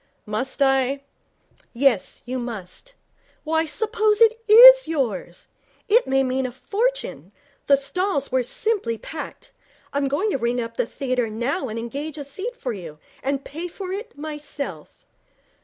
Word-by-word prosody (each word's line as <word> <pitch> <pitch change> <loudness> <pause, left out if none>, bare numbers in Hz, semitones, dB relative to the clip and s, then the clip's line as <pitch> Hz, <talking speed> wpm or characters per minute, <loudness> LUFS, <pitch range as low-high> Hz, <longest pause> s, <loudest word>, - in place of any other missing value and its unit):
'Must 255 +7 -1
I?' 270 0 +2 0.7
'Yes, 245 -5 +1
you 255 +1 -3
must. 235 - -7 0.5
Why, 320 +1 +1
suppose 435 +3 +1
it 460 0 +5
is - - +10
yours! 230 - -3 0.4
It 470 +4 +4
may 270 0 +3
mean 260 0 0
a - - -7
fortune. 400 - -2 0.4
The 280 - +6
stalls 285 0 -1
were 260 0 +2
simply 250 - -1
packed. 305 +5 -8 0.4
I'm 280 0 +1
going 310 +11 0
to 275 - -1
ring 240 +1 0
up 230 -1 -4
the - - 0
theatre 250 -4 -2
now 240 +5 -2
and 220 - -5
engage 280 +7 -5
a 290 - -5
seat 395 - -5
for 250 - -3
you, 165 -7 -9 0.2
and 275 0 -2
pay 325 +5 -5
for 370 +1 -7
it 400 -4 -6
myself.' 290 - -7
275 Hz, 150 wpm, -23 LUFS, 245-380 Hz, 0.7 s, is